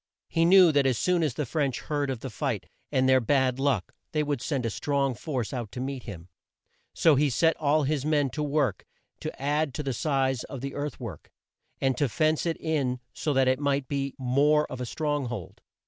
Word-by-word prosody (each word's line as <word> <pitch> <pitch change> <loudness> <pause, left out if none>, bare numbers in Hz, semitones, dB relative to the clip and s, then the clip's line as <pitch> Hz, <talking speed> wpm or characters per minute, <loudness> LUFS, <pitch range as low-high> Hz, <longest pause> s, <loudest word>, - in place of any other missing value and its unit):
He 165 0 +2
knew 180 -1 +7
that 140 -2 +3
as 130 -3 +1
soon 180 +4 +2
as 150 -7 0
the 150 - -1
French 135 0 -1
heard 145 -2 -2
of 130 -4 -3
the 135 - -6
fight - - -2 0.3
and 130 0 +2
their 130 0 +6
bad 130 +1 +1
luck, 135 -9 0 0.2
they 155 -1 +2
would 145 -4 -2
send 135 -5 -2
a 115 - -1
strong 140 +2 0
force 125 -1 -4
out 120 -6 -4
to 125 - -5
meet 135 0 -4
him, 90 -6 -8 0.6
so 160 - +4
he 145 +1 +3
set 165 +6 +3
all 150 0 +2
his 145 -1 0
men 145 -3 +1
to 150 - -4
work 145 -8 0 0.4
to - - -6
add 145 0 0
to 150 - -3
the 135 -2 -2
size 135 -1 0
of 135 -4 -7
the 135 0 -4
earth 145 -1 -4
work, 105 -11 -8 0.5
and 135 -1 +1
to 145 -3 +2
fence 155 +6 +1
it 165 - -1
in 135 -6 -1
so 150 - -2
that 135 -1 +3
it 130 0 +2
might 140 -2 0
be 140 -1 -2
more 145 +4 +3
of 130 - -5
a 125 - -3
strong 145 -1 -1
hold. 115 -8 -7
140 Hz, 220 wpm, -27 LUFS, 130-150 Hz, 0.6 s, knew